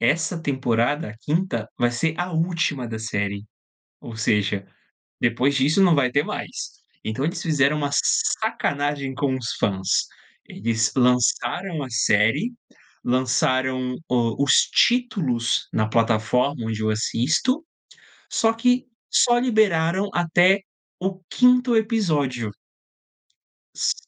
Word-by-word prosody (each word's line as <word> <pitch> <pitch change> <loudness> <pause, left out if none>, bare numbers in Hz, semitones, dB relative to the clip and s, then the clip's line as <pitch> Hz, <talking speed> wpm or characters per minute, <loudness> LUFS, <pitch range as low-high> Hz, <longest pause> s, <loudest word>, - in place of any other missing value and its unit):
essa 160 +8 +1
temporada, 130 -1 0
a 105 - -12
5ª, 145 - -2
vai 120 0 +2
ser 160 +6 -1
a 175 +1 -3
última 160 -6 -1
da 110 -1 -5
série, 105 -2 -3 0.6
ou 115 -2 -9
seja, 100 -2 0 0.6
depois 125 +4 +1
disso, 145 +8 +3
não 175 -4 +5
vai 130 -3 +1
ter 140 +3 +2
mais. - - -6 0.3
Então 110 +5 -3
eles 170 +5 -2
fizeram 150 -2 +2
uma 145 -1 -1
sacanagem 145 -1 0
com 135 0 0
os 120 -4 -4
fãs. 95 -1 0 0.4
Eles 115 0 -1
lançaram 125 +7 +1
a 130 - -7
série, 115 - +2 0.5
lançaram 130 0 0
o 120 +1 +1
os 140 - +4 0.2
títulos 195 - +1
na 110 0 0
plataforma 115 +3 +1
onde 110 -1 -3
eu 110 - 0
assisto, 145 - 0 0.7
só 225 -2 +2
que 245 +2 +1 0.3
só 240 0 +4
liberaram 200 -6 +2
até 175 +3 +3 0.4
o 190 0 -3
5º 250 -1 +4
episódio. 155 - 0 1.3
S - - +1
135 Hz, 120 wpm, -23 LUFS, 115-175 Hz, 1.3 s, não